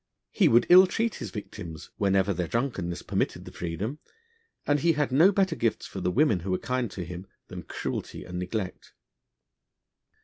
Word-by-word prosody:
He - - +4
would 120 +1 +5
ill 185 +1 +9
treat 225 +4 -1
his - - -4
victims, 85 -7 -8
whenever 100 0 +2
their 90 -1 -2
drunkenness 105 -8 -2
permitted - - -2
the - - -9
freedom, 95 - -4 0.7
and 145 0 +2
he 165 +3 +3
had 145 -3 0
no 160 +9 +6
better 190 -4 +1
gifts 115 -6 -1
for 95 - -7
the 90 - +1
women 115 - +3
who 90 +3 -6
were 90 - +1
kind 125 +1 -2
to 90 -1 -6
him 90 +3 -8 0.2
than - - -7
cruelty - - -5
and 90 0 -5
neglect. 95 +1 -5
105 Hz, 175 wpm, -27 LUFS, 90-145 Hz, 0.7 s, ill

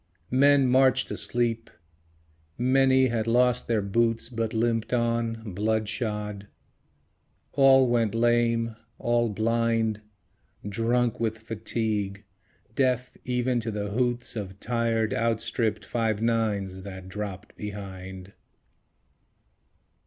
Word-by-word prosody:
Men 140 +1 +5
marched 130 +1 +3
asleep. 115 -1 -1 0.9
Many 130 +1 +4
had 115 -1 -1
lost 125 +1 +2
their 110 -3 +1
boots 115 +4 0
But 115 -2 -2
limped 115 +1 0
on, 115 -3 -1
blood 110 +2 0
shod. 105 -2 -3 1.0
All 135 -1 +6
went 115 -2 +1
lame; 115 -1 +2 0.2
all 120 -1 +1
blind; 115 0 0 0.7
Drunk 115 +3 0
with 110 -1 -1
fatigue; 110 -2 -3 0.5
deaf 125 -2 +1
even 125 0 0
to 115 0 -3
the 105 -1 -3
hoots 120 +2 -1
Of 100 -3 -6
tired, 115 -1 0
outstripped 115 0 -1
Five 110 -3 -1
Nines 105 -5 0
that 95 -1 -9
dropped 100 0 -6
behind. 95 -2 -8
115 Hz, 100 wpm, -26 LUFS, 105-120 Hz, 1.0 s, All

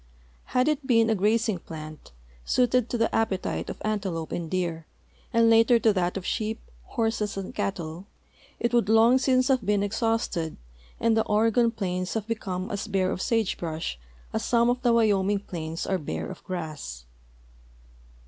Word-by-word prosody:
Had 255 +2 +1
it 300 -3 0
been 230 -3 +4
a - - +4
grazing 215 0 +1
plant, 155 -2 -9 0.3
suited 250 - +2
to 240 - -1
the 225 0 +3
apj)etite 200 -4 -1
of - - -6
antelope 190 -7 -2
and 170 -2 -3
deer, 170 -3 -2 0.4
and 230 -1 +4
later 225 +1 +6
to 225 -2 +3
that 180 -1 0
of 185 - -6
sheep, 220 +1 -2 0.3
horses, 225 -3 -1
and 195 -1 -5
cattle, 175 -1 -4 0.5
it 235 0 0
would 235 -4 +3
long 225 +3 +6
since 255 -1 +3
have 260 -4 +2
been 205 0 +1
exhausted 205 -6 -1 0.4
and 230 -1 +3
the 220 - +3
Oregon 225 +2 +3
plains 185 -4 -3
have 220 -2 -1
become 195 -3 -3
as 205 +1 -3
bare 190 -2 +1
of 185 - -3
sage 225 -4 0
brush 160 - -4 0.3
as - - -1
some 235 0 +3
of 250 0 -2
the 240 - +3
Wyoming 205 -3 +3
plains 165 -4 -5
are 190 -1 0
bare 80 - -4
of - - -11
grass 155 - -6
210 Hz, 165 wpm, -26 LUFS, 180-230 Hz, 0.5 s, later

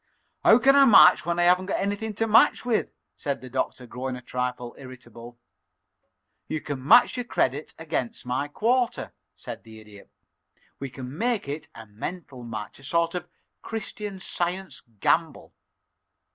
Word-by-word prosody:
"How 220 - +7
can 270 +2 +5
I 280 -1 +7
match 220 -7 +7
when 170 0 0
I 175 - +3
haven't 180 +2 +3
anything 205 +2 -2
to 225 - 0
match 225 +2 +4
with?" 235 -3 0 0.3
said 140 -1 -3
the 130 -1 -11
Doctor, 130 -1 -3
growing 125 +2 -5
a 125 - -9
trifle 125 -1 -4
irritable. 120 -2 -12 1.1
"You 155 - -2
can 140 -3 -6
match 240 - +6
your 245 - -1
credit 150 - -1
against 160 -8 -4
my 130 +3 -1
quarter," 235 - 0 0.2
said - - -8
the 110 -1 -13
Idiot. 105 -2 -15 0.7
"We 135 - -5
can 130 +1 -8
make 230 - -1
it 150 +2 -5
a 115 - -10
mental 130 - -7
match 110 -2 -7
a - - -17
sort 170 +4 0
of 180 - -4 0.3
Christian 210 -2 -6
Science 185 +1 -4 0.2
gamble. - - 0
150 Hz, 155 wpm, -25 LUFS, 125-200 Hz, 1.1 s, How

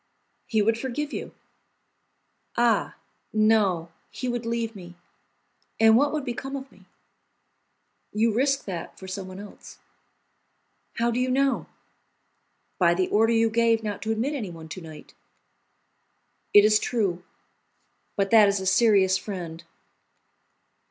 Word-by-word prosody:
"He 220 -2 +1
would 225 +2 +1
forgive 280 +4 -4
you." - - -5 1.3
"Ah, 235 -1 +2 0.4
no, 210 -6 +2 0.2
he 255 - -5
would 240 -1 -3
leave 230 -1 -2
me, 175 -2 -11 0.8
and 225 0 +6
what 285 +4 +3
would 300 -3 -3
become 265 +3 -5
of 270 0 -7
me?" - - -21 1.3
"You 225 +1 +1
risk 275 +4 +1
that 180 -4 -6
for 190 - -10
someone 185 0 -7
else." 205 0 -12 1.2
"How 235 +1 +1
do 240 - -1
you 255 0 0
know?" 270 +1 +1 1.1
"By 170 -2 +4
the 185 +1 0
order 225 +2 +3
you 225 0 +2
gave 230 0 +2
not 210 -2 -4
to 220 - -2
admit 235 +7 -1
anyone 175 - -6
to 185 - -7
night." 160 -2 -12 1.4
"It 205 0 +7
is 215 0 +5
true; 195 -9 -1 0.9
but 195 -1 0
that 220 -2 +7
is 200 0 +1
a 190 - -5
serious 190 -1 +4
friend." 175 -5 -7
220 Hz, 130 wpm, -25 LUFS, 190-235 Hz, 1.4 s, It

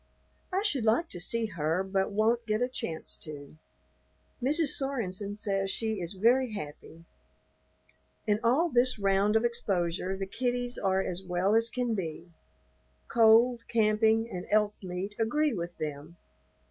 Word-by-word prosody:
I 380 +2 0
should 285 - +1
like 230 +10 +2
to 175 - -6
see 230 +6 +1
her 165 -2 -1
but 190 +1 -1
won't 225 +3 +1
get 215 0 +1
a 245 - +1
chance 165 -10 -5
to. 150 -1 -9 0.8
Mrs. 300 +4 +4
Sorenson 210 -8 0
says 195 -2 -1
she 220 0 -2
is 170 +2 -3
very 235 +4 +2
happy. 165 -2 -9 1.2
In 210 -1 +1
all 275 +9 +3
this 250 -2 +2
round 200 +1 +2
of 220 +2 +3
exposure 190 -5 -1
the 195 - -3
kiddies 245 +3 -2
are 190 -1 +1
as 185 -1 -3
well 185 +2 0
as 225 +1 +3
can 245 -1 -1
be. 170 -3 -5 0.8
Cold, 235 +1 +5
camping, 220 0 +2
and 180 -6 -7
elk 210 0 +2
meat 185 +2 -5
agree 295 +6 +1
with 175 -3 -5
them. 150 +2 -6
210 Hz, 145 wpm, -29 LUFS, 185-235 Hz, 1.2 s, Cold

